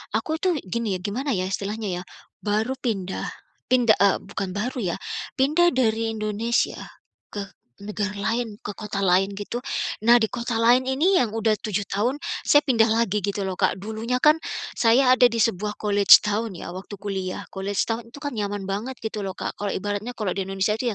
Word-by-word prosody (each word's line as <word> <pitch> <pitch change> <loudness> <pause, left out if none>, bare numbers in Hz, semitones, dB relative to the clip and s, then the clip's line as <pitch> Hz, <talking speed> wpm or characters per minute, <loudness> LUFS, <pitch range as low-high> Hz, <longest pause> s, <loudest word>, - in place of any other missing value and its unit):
aku 225 +7 -1
tuh 360 -4 +2
gini, 215 -1 -1
gimana 250 +8 -2
ya, 185 - -1
istilahnya 200 -1 -3
ya, - - -10 0.4
baru 215 +5 0
pindah, 195 -6 -2 0.4
pinda 240 -3 +5
eee, 200 - +4
bukan 195 -1 -4
baru 245 +5 -2 0.2
ya, - - -8 0.4
pindah 310 +6 +4
dari 225 -3 +1
Indonesia 215 +3 0 0.5
ke 205 - -4 0.4
negara 205 0 -3
lain, 225 +2 -2
ke 210 - -4
kota 205 -1 -4
lain 190 +2 +3
gitu. 205 +4 -4 0.5
Nah 240 - +9
di 225 -3 +2
kota 235 -1 -3
lain 240 +3 +4
ini 320 +9 +3
yang 225 -3 0
udah 220 -1 +1
7 205 -2 -2
tahun, 235 +7 +1 0.3
saya 290 0 +6
pindah 230 -4 +3
lagi 220 -2 +1
gitu 200 +1 -2
loh 190 -1 -4
Kak. - - +2
Dulunya 220 +5 -3
kan, 305 +1 +6 0.3
saya 250 +2 +4
ada 255 -1 +7
di 230 - -5
sebuah 210 -1 -1
college 205 -2 +6
town 210 0 -1
ya 175 - -7
waktu 190 +3 -8
kuliah. 195 -2 -4
Kuliah 195 +1 -4
setahun 225 +3 -1
itu 285 - -11
kan 285 - -2
nyaman 205 -3 -3
banget 205 +7 -4
gitu 220 -1 -3
loh 190 - -5
Kak, - - -5
kalau 205 -1 -2
ibaratnya 205 +5 -3
kalau 210 -6 -2
di 190 +1 -3
Indonesia 195 +2 0
itu 250 - -1
215 Hz, 185 wpm, -24 LUFS, 200-240 Hz, 0.5 s, Nah